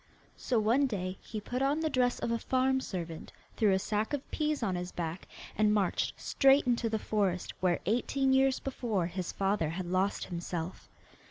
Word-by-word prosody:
So 250 - -1
one 240 +6 +3
day 185 -5 -4
he 220 - -6
put 245 +5 -4
on 285 +3 +2
the 320 - +1
dress 250 -2 +2
of 230 - -2
a 230 - 0
farm 265 +1 +1
servant, 170 -8 -6 0.2
threw 215 -3 +3
a 190 - +4
sack 210 +5 -1
of 285 -2 -4
peas 305 -4 0
on 195 -4 0
his 180 0 -4
back, 170 +1 -4 0.3
and 215 -1 +3
marched 205 -3 0
straight 275 0 +4
into 240 -2 +1
the 220 - 0
forest 200 -4 -1
where 180 -2 +1
eighteen 265 +6 +1
years 265 0 +3
before 230 -9 -1
his 180 +1 -4
father 195 -5 0
had 175 +3 -4
lost 185 +3 0
himself. 175 0 -5
215 Hz, 185 wpm, -31 LUFS, 185-260 Hz, 0.3 s, a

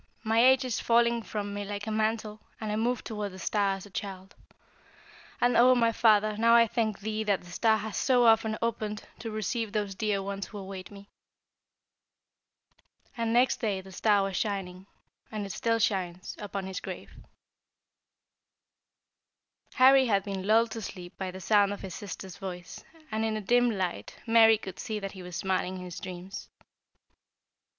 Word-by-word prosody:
My 225 +1 +3
age 260 0 +5
is 250 - -1
falling 235 0 +3
from 205 -2 -4
me 205 0 -3
like 205 0 -5
a 220 - -3
mantle, 215 0 -1 0.2
and 215 -1 -3
I - - 0
move 235 +2 0
toward 210 -3 -4
the - - -9
star 200 +1 0
as 195 - -9
a 205 - -15
child. 190 0 -6 1.1
And, 245 0 +3
O 255 +2 +6
my 230 -1 +3
Father, 215 -2 +3
now 230 +1 +5
I 235 0 +7
thank 220 -3 -1
thee 215 +1 -2
that 200 -2 +1
the 175 - -13
star 220 +4 +3
has 215 0 -5
so 250 -2 +3
often 225 -1 +4
opened 215 -2 -2 0.2
to 230 - -5
receive 215 +1 -3
those 205 -2 -1
dear 200 0 -1
ones 200 0 -4
who 210 - -9
await 190 -1 -7
me!' 200 0 -14 2.0
"And 230 -2 -1
next 245 +2 +3
day 205 -5 0
the 190 0 -12
star 205 +1 +2
was 195 -1 -3
shining, 190 -2 -3 0.4
and 215 -2 -3
it 195 - -6
still 230 +5 0
shines, 185 -5 -1
upon 200 -2 -5
his 190 -1 -4
grave." - - -8 2.6
Harry 265 0 +6
had 200 -3 +2
been 195 -1 -4
lulled 225 +1 +4
to 225 - -5
sleep 180 -3 -8
by 190 -1 -4
the 185 +1 -8
sound 205 +1 +3
of 205 - -8
his 190 -3 -7
sister's 190 -2 -8
voice, 180 -2 -7 0.3
and 220 0 -1
in 220 -1 0
the 215 - -3
dim 245 +4 +3
light 190 -5 -3
Mary 225 -1 +6
could 190 -3 -9
see 220 -3 -3
that 195 -1 -5
he 190 - -10
was 180 -1 -8
smiling 185 -1 -1
in 180 - -7
his 180 0 -7
dreams. 185 +1 -8
210 Hz, 180 wpm, -29 LUFS, 195-225 Hz, 2.6 s, I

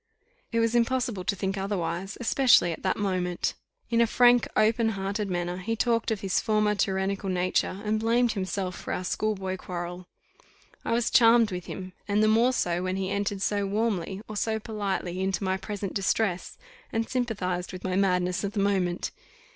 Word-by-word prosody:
It 230 - +1
was 230 0 +2
impossible 240 -4 +1
to 200 - 0
think 195 0 -2
otherwise, 190 -1 -3
especially 245 -6 +4
at 160 - -6
that 190 - 0
moment. 185 -3 -1 0.4
In 230 0 +4
a 235 - +4
frank, 245 0 +5
open 225 +1 +3
hearted 200 +1 -2
manner, 175 0 -2
he 225 +5 -2
talked 230 0 +1
of 220 -3 -1
his 190 -2 +1
former 215 -1 +2
tyrannical 195 0 -1
nature, 185 +1 0
and 215 +1 +1
blamed 235 +2 +2
himself 190 -2 -3
for - - -5
our 180 - -3
schoolboy 190 -1 -2
quarrel. 175 0 -6 0.8
I - - -1
was 235 0 +1
charmed 230 -2 +6
with 180 -1 -5
him, 185 -1 -7
and 205 +1 +2
the - - +4
more 230 +4 +4
so, 175 -8 0
when 185 0 -1
he 190 0 -2
entered 200 -1 -1
so 205 -1 0
warmly 200 -3 -1
or 215 - -7
so 220 +1 0
politely 200 -5 -3
into 190 +1 -1
my 190 0 +1
present 200 0 -5
distress, 195 -2 -1 0.3
and 225 0 -1
sympathized 195 -8 -2
with 185 - -8
my 185 -1 -1
madness 180 -2 +1
of 200 0 -2
the 210 - -1
moment. 190 -3 0
200 Hz, 180 wpm, -27 LUFS, 185-220 Hz, 0.8 s, charmed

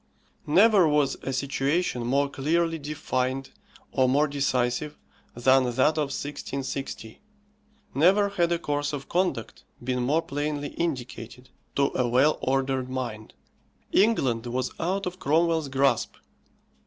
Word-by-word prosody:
Never 195 +3 +5
was 150 -2 +2
a 135 - -3
situation 135 0 -1
more 140 +3 +2
clearly 165 +4 0
defined 135 -3 -2 0.4
or 130 -1 +2
more 145 +4 +3
decisive 140 0 -1 0.4
than 130 +2 +4
that 130 +5 +2
of 150 - +2
1660. 140 - -5 0.7
Never 190 +8 +4
had 175 -4 0
a 170 - +2
course 145 -2 -2
of 140 -2 -5
conduct 180 -10 -2 0.2
been 125 0 -1
more 150 +7 +1
plainly 145 -1 -3
indicated 130 -5 -5 0.3
to 140 0 +2
a 125 - +1
well 135 +6 +3
ordered 135 -1 0
mind. 120 -4 -5 0.6
England 130 - +2
was 125 +1 -2
out 190 +4 -1
of 180 +1 -5
Cromwell's 160 0 +1
grasp. 135 -3 +1
140 Hz, 125 wpm, -26 LUFS, 130-160 Hz, 0.7 s, Never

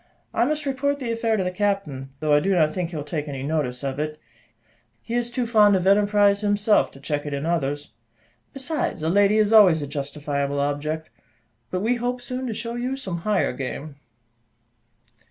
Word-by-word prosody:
I 235 - +2
must 300 +2 -1
report 280 +1 0
the 250 -4 -3
affair 230 -1 0
to 190 - 0
the 180 - -1
captain, 180 -9 -2
though 155 -1 +2
I 145 - +6
do 195 +5 +1
not 155 -3 +3
think 175 -1 -2
he 170 - -8
will 150 - -3
take 150 0 -4
any 135 -2 -5
notice 140 -4 -2
of 135 0 -3
it; 150 0 -3 0.9
he 230 - -6
is 240 0 0
too 240 0 -2
fond 210 -3 +5
of 185 -1 0
enterprise 205 0 +4
himself 205 +1 +3
to 135 - -13
check 145 +1 -2
it 145 - -2
in 140 +2 -3
others. 145 -5 -1 0.6
Besides, 275 - -3
a 160 - +1
lady 200 +3 +4
is 215 0 +3
always 180 -8 +7
a - - -2
justifiable 140 0 -3
object, 150 +2 -2 0.6
but 185 - -2
we 240 +4 +1
hope 245 +1 -2
soon 255 +1 -5
to 230 - -2
show 230 +2 -4
you 245 +2 -2
some 190 -10 -4
higher 205 -2 +1
game." 140 +3 -6
185 Hz, 195 wpm, -24 LUFS, 145-225 Hz, 0.9 s, always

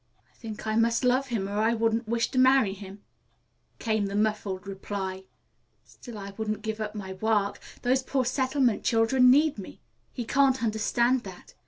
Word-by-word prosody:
"I - - -35
think 220 -2 -8
I 215 0 -1
must 230 +2 +2
love 255 +2 +2
him, 220 -6 -2
or 205 +1 -3
I 225 +2 +2
wouldn't 225 0 0
wish 230 +1 0
to 255 - 0
marry 260 -6 +4
him," 200 0 -11 0.7
came 220 -3 -1
the 200 - -5
muffled 210 -2 -1
reply. 190 -1 -5 0.6
"Still 240 -4 -12
I 200 -1 -7
won't 215 -1 -3
give 220 0 -4
up 215 0 -4
my 190 -2 -6
work. 205 0 0 0.2
Those 255 +2 +2
poor 260 0 -1
settlement 260 -1 +1
children 240 +3 +4
need 290 -1 +4
me. 190 - -10 0.3
He 240 - -5
can't 265 0 +2
understand 235 +3 +1
that. 185 -2 -11
220 Hz, 175 wpm, -27 LUFS, 205-250 Hz, 0.7 s, marry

